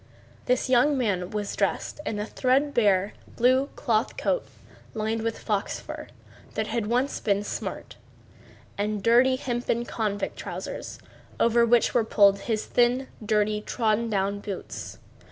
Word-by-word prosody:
This 250 +1 +2
young 260 +3 +4
man 195 -8 0
was 210 -1 -3
dressed - - -1
in 210 - -2
a 210 - -2
threadbare 240 -7 +2 0.2
blue 255 +3 +3
cloth 220 -1 0
coat - - 0 0.5
lined 220 +1 -1
with 225 0 -2
fox 205 -3 -2
fur, - - -8 0.5
that - - 0
had 225 -3 -2
once 250 +5 0
been 200 -1 +1
smart, - - -5 0.8
and 210 -1 -1
dirty 245 +3 +5
hempen 240 -2 -2
convict 210 -4 -2
trousers, - - -6 0.4
over 235 0 +4
which 240 0 +4
were 240 - +3
pulled 200 -2 +4
his 220 0 -2
thin, 245 +2 +2
dirty, 210 0 +1
trodden 225 0 0
down 200 -1 0
boots. 200 -2 -6
225 Hz, 135 wpm, -26 LUFS, 210-245 Hz, 0.8 s, dirty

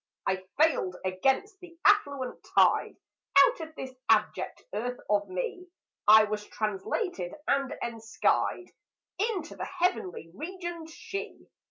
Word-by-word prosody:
I 190 -1 0 0.2
failed 300 - +3
against 270 - +1
the 345 -2 -14
affluent 285 -11 +2
tide; - - +4 0.4
Out - - +7
of 320 -1 -8
this 260 -3 -6 0.2
abject 215 -1 +1
earth 245 +4 -2
of 205 -1 +1
me 185 - -4 0.4
I 215 +1 +9
was 210 0 -2
translated 210 - -3
and 275 -1 +1
enskied 230 +9 0 0.5
Into 400 -6 -1
the - - -5
heavenly 185 - -1
regioned 345 - -6
She. 395 +6 -7
270 Hz, 120 wpm, -29 LUFS, -, 0.5 s, I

